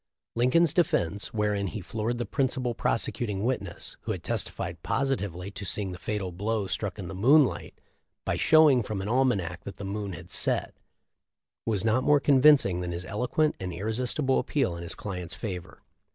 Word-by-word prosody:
Lincoln's 135 +7 +3
defense, 105 - +1
wherein 105 -3 0
he 105 - -5
floored 110 +5 -3
the 120 - -2
principal 125 +1 0
prosecuting 110 -3 -1
witness, 105 -8 -3
who - - -2
had - - -7
testified - - -3
positively 100 -9 -2
to 100 - -7
seeing 100 0 -2
the 90 - -8
fatal 100 -3 -3
blow 105 +4 -1
struck 100 +1 -3
in 95 -4 -6
the 80 - -6
moonlight, 130 +8 +3 0.5
by - - 0
showing 155 -5 +5
from 100 -3 -4
an - - -4
almanac 105 -9 +1
that 100 - -8
the 100 - -6
moon 100 0 -4
had - - -10
set, - - 0 0.9
was 105 -2 0
not 115 +3 +2
more 145 +1 +5
convincing 135 -10 +5
than 90 -1 -3
his 85 +1 -5
eloquent 125 +10 0
and 95 -1 -4
irresistible 125 - 0
appeal 130 - 0
in 85 - -7
his 85 - -1
client's 90 -4 -6
favor. 90 -6 -6
105 Hz, 170 wpm, -28 LUFS, 95-130 Hz, 0.9 s, showing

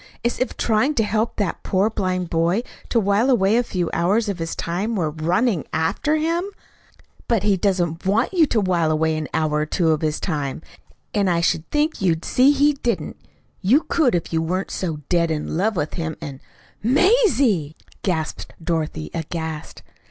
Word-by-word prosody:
"As 235 - 0
if 255 - -2
trying 235 +7 +1
to 225 - +3
help 215 +2 0
that 200 -5 -2
poor 190 +2 +1
blind 185 -5 -2
boy 170 +7 +1 0.3
to 235 - +3
while 205 +4 +2
away 210 -4 +3
a 240 - +4
few 185 -7 -2
hours 205 +6 +2
of 190 -3 -3
his 165 0 -3
time 195 +7 -2
were 160 -6 0
RUNNING 175 - 0
AFTER 160 - +1
HIM." 330 +3 0 0.8
"But 230 -4 +1
he 205 -1 +3
doesn't 175 -4 0
WANT 210 - +1
you 335 -4 +4
to 230 - +1
while 175 -5 +1
away 160 0 +1
an 155 -1 -3
hour 150 -1 0
or 150 - 0
two 165 +1 +1
of 155 - 0
his 155 -1 -1
time. 150 -4 -3 0.5
And 200 -3 +2
I 170 -1 +2
should 165 -1 0
think 300 -2 0
you'd 165 -3 +1
see 255 +2 +4
he 290 +1 +4
didn't. 245 -4 -2 0.4
You 245 - +4
could 280 - +2
if 170 -1 -3
you 160 - +2
weren't 185 +4 -2
so 160 -5 -3
dead 170 -2 +2
in 155 -1 -2
love 205 +5 +1
with 150 -3 -2
him, 160 -3 -3
and 135 -2 -7 0.3
" - - -32
"Mazie!" 260 - +3 0.3
gasped 160 -5 -3
Dorothy, 155 - -2
aghast. 160 -1 -5
185 Hz, 185 wpm, -22 LUFS, 160-230 Hz, 0.8 s, a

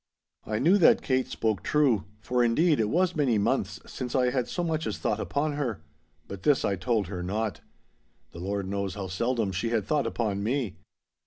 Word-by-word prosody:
I 105 - -1
knew 170 - +4
that 175 - +5
Kate 130 -1 +1
spoke 110 -5 -1
true—for, 120 -4 +1
indeed, 150 +7 +3
it 110 -2 +1
was 180 +4 +1
many 135 -7 +2
months 100 - 0
since 125 0 -5
I 125 -1 +3
had 125 -2 0
so 175 - -2
much 160 -2 -1
as - - -3
thought - - -1
upon 150 +2 -1
her. 120 - -3 0.4
But 100 -1 -7
this 145 +6 +3
I 100 - +1
told 105 +2 0
her 90 0 -5
not. 105 +3 -2 0.7
The 85 - -10
Lord 100 +1 -3
knows 100 -1 -2
how 95 -2 -5
seldom 115 +2 0
she 95 +6 -2
had 115 -4 0
thought 145 -2 +1
upon 105 -4 -1
me. 115 -2 -1
115 Hz, 190 wpm, -27 LUFS, 100-135 Hz, 0.7 s, that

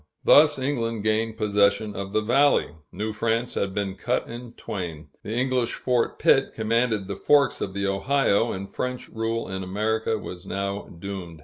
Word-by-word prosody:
Thus 150 0 +6
England 115 -5 -2
gained 110 +1 0
possession 105 0 +2
of 100 0 -5
the 110 - +1
valley. 140 +6 +3 0.2
New 105 +3 -3
France 115 +2 -1
had 100 - -1
been 100 -2 -1
cut 120 +5 -1
in 120 0 -8
twain. 80 -9 -6
The - - -9
English 125 0 0
Fort 125 -2 0
Pitt 135 - +3
commanded 110 -2 0
the 100 - -4
Forks 145 -2 +3
of 95 - -3
the 100 0 -1
Ohio, 115 +2 +2
and 95 +1 -5
French 125 +3 -4
rule 115 +1 -2
in 95 0 -4
America 110 +4 -1
was 90 -3 -8
now 100 +1 -3
doomed. 90 -2 -7
110 Hz, 170 wpm, -25 LUFS, 100-120 Hz, 0.2 s, Thus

